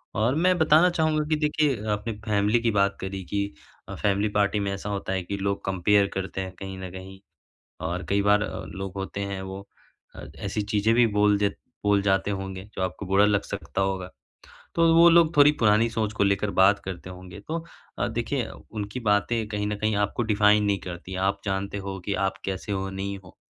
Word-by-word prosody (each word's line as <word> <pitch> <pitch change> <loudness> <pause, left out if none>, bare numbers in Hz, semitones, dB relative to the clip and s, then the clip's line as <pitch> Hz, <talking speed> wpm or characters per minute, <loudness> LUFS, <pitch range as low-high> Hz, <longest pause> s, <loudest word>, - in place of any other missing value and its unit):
और 115 +6 +2
मैं 180 +3 +3
बताना 160 +2 +5
चाहूँगा 155 -3 +1
कि 155 - +3
देखिए 150 -6 +1
आपने 105 +2 -2
फैमिली 105 +2 +2
की 115 - +2
बात 100 -1 +1
करी 95 0 -5
कि 100 +2 -1 0.5
अ, - - -5
फैमिली 105 +1 +1
पार्टी 105 0 +2
में 100 -1 -1
ऐसा 100 +1 -5
होता 100 -1 -3
है 95 -1 -1
कि 100 +3 -4
लोग 100 0 -2
कंपेयर 100 +2 +3
करते 95 0 -3
हैं 95 -1 -5
कहीं 95 -1 -6
न 95 0 -6
कहीं 95 +1 -10 0.7
और 90 +2 -3
कई 100 0 +2
बार 105 +1 +4
अ, 95 - -4
लोग 95 +4 -6
होते 95 +1 -4
हैं 95 - -4
वो 95 +1 -7 0.5
अ, - - -8
ऐसी 105 - -2
चीज़ें 105 +2 +1
भी 120 0 +5
बोल 105 0 +4
देत 100 -1 0 0.3
बोल 100 -1 +3
जाते 95 0 +1
होंगे 95 -1 -5
जो - - -3
आपको 95 +2 -3
बुरा 95 +2 +4
लग 105 -1 +2
सकता 100 -1 -5
होगा। 95 -2 -1 0.7
तो 165 - +3
वो 170 +1 +8
लोग 170 -1 +5
थोड़ी 145 +1 +8
पुरानी 110 +1 +4
सोच 110 -2 -2
को 105 - +1
लेकर 100 +1 +1
बात 100 +2 +4
करते 95 -1 -6
होंगे। 90 +1 -10
तो 160 - -2 0.4
अ, - - +1
देखिए 120 +2 -2 0.2
उनकी 105 +3 -4
बातें 110 +1 +1
कहीं 105 -1 -2
न 105 - -1
कहीं 110 0 0
आपको 105 +3 0
डिफाइन 105 -1 +4
नहीं 100 -1 +2
करती। 90 +1 -7
आप 100 0 -1
जानते 100 0 -2
हो 95 -1 -5
कि 100 - -1
आप - - -5
कैसे 95 +1 -4
हो 95 -1 -2
नहीं 100 +1 -4
हो। 90 - -16
100 Hz, 210 wpm, -26 LUFS, 95-110 Hz, 0.7 s, वो